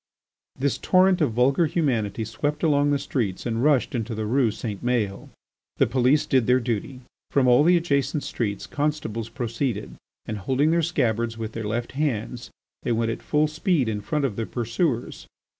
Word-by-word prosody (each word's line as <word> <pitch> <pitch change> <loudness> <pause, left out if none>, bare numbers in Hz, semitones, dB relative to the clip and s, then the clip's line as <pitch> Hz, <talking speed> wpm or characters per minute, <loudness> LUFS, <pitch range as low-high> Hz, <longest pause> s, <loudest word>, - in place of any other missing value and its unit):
This 140 +1 0
torrent 185 -1 +4
of 140 -7 +2
vulgar 135 +7 +3
humanity 115 - -1
swept 145 +8 -3
along 145 -2 +3
the 145 - +2
streets 115 -9 -3
and 115 0 -1
rushed 145 -4 +3
into 115 -2 -3
the 110 0 -3
Rue 120 +2 +2
St. 105 -1 -5
Maël. 115 -6 -1 0.5
The - - +4
police 130 +3 +2
did 130 -4 +2
their 125 +1 +4
duty. 125 +2 -3 0.3
From 135 -2 +2
all 125 +3 +6
the 175 +2 +5
adjacent 145 -3 0
streets 100 -4 -3
constables 145 -7 -2
proceeded 115 -2 -3 0.3
and, 110 -1 -4
holding 135 +9 +1
their 170 0 +3
scabbards 115 -8 0
with 110 -1 -4
their 115 -1 -5
left 115 +3 -2
hands, 125 -4 -2 0.3
they - - -2
went 115 0 +1
at - - -5
full 150 0 +1
speed 155 - 0
in 105 -2 -2
front 145 +7 -1
of 110 -7 -3
the 115 - -2
pursuers. 120 +2 -2
125 Hz, 175 wpm, -24 LUFS, 115-145 Hz, 0.5 s, all